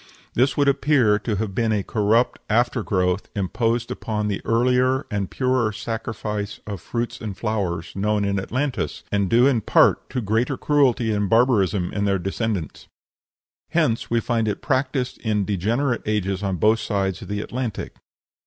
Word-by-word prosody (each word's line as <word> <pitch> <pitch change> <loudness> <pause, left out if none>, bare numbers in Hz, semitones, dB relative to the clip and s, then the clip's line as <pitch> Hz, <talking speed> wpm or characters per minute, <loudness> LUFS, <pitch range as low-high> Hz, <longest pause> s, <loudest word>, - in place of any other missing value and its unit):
This 125 +1 +2
would 145 -1 +3
appear 140 -6 +3
to 110 0 -2
have 100 -1 -3
been 115 +2 +1
a 105 -2 +1
corrupt 110 +4 +1
after 120 +2 +2
growth 90 -1 0
imposed 115 +4 -1
upon 105 -1 -2
the 100 - -2
earlier 125 +3 +2
and 100 -2 -2
purer 130 -4 +1
sacrifice 105 -1 -4
of 100 -4 -6
fruits 115 +2 -4
and 105 -4 -5
flowers 95 -7 -2
known 105 +1 +1
in 100 0 0
Atlantis, 130 +7 -2
and 100 -2 +1
due 120 +4 +5
in 130 -5 +3
part - - +3
to 130 - -2
greater 115 +5 0
cruelty 130 -6 +2
and 105 -2 0
barbarism 105 -6 +2
in 100 0 0
their 100 -1 +2
descendants. 95 - -3 0.8
Hence 150 -9 +1
we 115 - +2
find 115 -2 0
it 105 - -3
practised 130 -2 -1
in 105 -3 0
degenerate 115 +7 0
ages 100 -3 -1
on 100 -2 -1
both 110 +6 +3
sides 95 -4 -1
of - - -8
the 105 0 -2
Atlantic. 120 -2 -4
110 Hz, 160 wpm, -23 LUFS, 100-120 Hz, 0.8 s, due